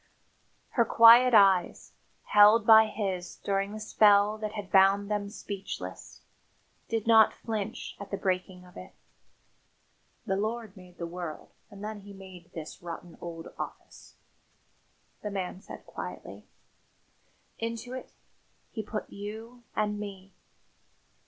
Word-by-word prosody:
Her 235 - +2
quiet 230 +2 +7
eyes, 195 -4 +4 0.3
held 210 +2 +6
by 220 0 +8
his 195 -4 -4
during 195 0 -2
the 215 - -7
spell 210 -1 +4
that 215 -1 -4
had 205 -3 -7
bound 195 +1 +4
them 205 -1 -1
speechless, 200 -1 -8 0.7
did 225 -2 -1
not 225 -1 +6
flinch 220 -1 -5
at 200 0 -8
the 200 - -3
breaking 185 -1 -3
of 180 - -18
it. 90 - -11 1.3
"The 195 - -1
Lord 220 0 -3
made 180 -2 -15
the 170 - -4
world 170 -2 -7 0.2
and 200 -1 -12
then 215 0 -5
He 200 0 -12
made 185 -3 -13
this 160 -2 -8
rotten 170 0 -8
old 165 -1 -7
office," - - -9 1.1
the 210 - -4
man 190 -2 -5
said - - -11
quietly. - - -9 1.1
"Into 230 +2 -5
it 260 - -7 0.6
He 220 - -4
put 215 0 -5
you 220 +4 -9
and 210 -1 -1
me. 195 -2 -8
205 Hz, 130 wpm, -28 LUFS, 190-220 Hz, 1.3 s, by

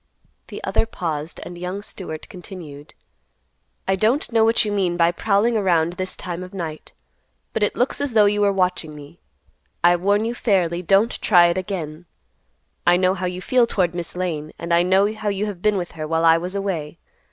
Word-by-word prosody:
The - - -9
other 225 - +1
paused, 160 -6 -4
and 175 0 -9
young 185 +3 -4
Stewart 160 -7 -7
continued; 160 -6 -11 0.9
"I 190 - +3
don't 230 - +1
know 225 -1 +4
what 225 0 +3
you 210 - -2
mean 185 -4 0
by 170 0 +4
prowling 210 +5 +1
around 175 -5 +2
this 185 0 -2
time 175 -1 -5
of 185 +1 -9
night. 160 -4 -6 0.6
But 220 - -2
it 205 - +1
looks 250 +3 0
as 285 -4 -2
though 215 -2 +6
you 205 0 +2
were 200 -1 +4
watching 180 -5 -1
me. 145 -1 -13 0.6
I 175 0 +6
warn 200 +4 +1
you 230 - -1
fairly, 180 -7 +1
don't 195 +6 +2
try 175 -4 +6
it 170 - -1
again. 175 -4 -5 0.8
I 175 0 +6
know 185 0 +3
how 185 -1 -3
you 180 +1 -5
feel 250 -2 +3
toward 180 -6 0
Miss 175 -1 -5
Lane, 160 -4 -3
and 170 0 -3
I 170 - +5
know 190 +4 +3
how 215 -1 -3
you 200 +1 -1
have 200 -4 -6
been 210 0 +2
with 175 -2 -4
her 155 -1 -6
while 165 +1 +1
I 165 0 +7
was 180 +3 -3
away. 170 -6 -3
185 Hz, 200 wpm, -22 LUFS, 170-205 Hz, 0.9 s, I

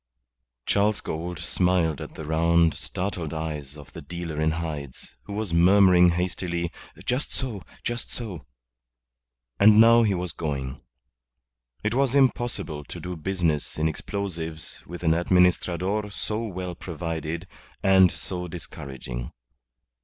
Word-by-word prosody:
Charles 105 +1 +2
Gould 85 +2 -4
smiled 90 -5 +1
at - - -8
the 80 - -7
round, 85 +1 +3
startled 90 -5 -3
eyes 75 -3 -5
of 75 - -13
the - - -8
dealer 85 -3 -5
in 80 - +3
hides, 75 -5 -5
who 100 - -7
was 105 -4 -2
murmuring 90 0 +6
hastily, 85 -1 -1 0.3
"Just 130 +4 0
so. 120 -8 -3 0.2
Just 120 +1 -3
so." 105 -10 -5 1.1
And 105 +1 +8
now 115 +1 +8
he 105 -4 +2
was 90 -1 -3
going. 70 -4 -4 1.0
It 110 +1 0
was 135 +1 +2
impossible 120 - +1
to - - -8
do 90 0 -5
business 80 -3 -1
in 80 +1 +2
explosives 80 -3 -4
with 90 +1 -8
an 80 -1 +4
Administrador 90 +3 +2
so 110 +3 -3
well 90 -3 -4
provided 85 0 -4 0.4
and 95 -1 +7
so 90 -1 -4
discouraging. 65 -7 -7
90 Hz, 130 wpm, -26 LUFS, 80-100 Hz, 1.1 s, And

